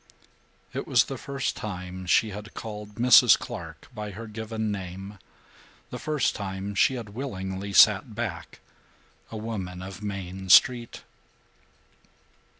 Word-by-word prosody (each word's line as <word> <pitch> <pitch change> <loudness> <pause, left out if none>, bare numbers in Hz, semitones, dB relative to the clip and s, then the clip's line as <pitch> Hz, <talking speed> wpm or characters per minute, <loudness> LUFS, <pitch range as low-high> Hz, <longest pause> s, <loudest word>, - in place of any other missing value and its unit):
It - - -4
was - - +5
the - - -6
first 140 -1 -3
time 90 -2 -6
she 110 +4 +3
had 105 +2 -9
called 105 -2 -7
Mrs. 120 0 +7
Clark - - -8
by 105 -2 -5
her 105 +4 -8
given 110 0 -4
name; 95 +1 -7 0.7
the - - -5
first 150 -4 0
time 95 0 -5
she 130 +6 +3
had 115 -4 -6
willingly 100 -5 -5
sat 110 +2 +5
back, 100 -8 -5 0.7
a 110 - -6
woman 95 -5 -5
of 95 +1 -9
Main 95 -2 -6
Street. 120 +4 +5
105 Hz, 130 wpm, -26 LUFS, 95-110 Hz, 0.7 s, Mrs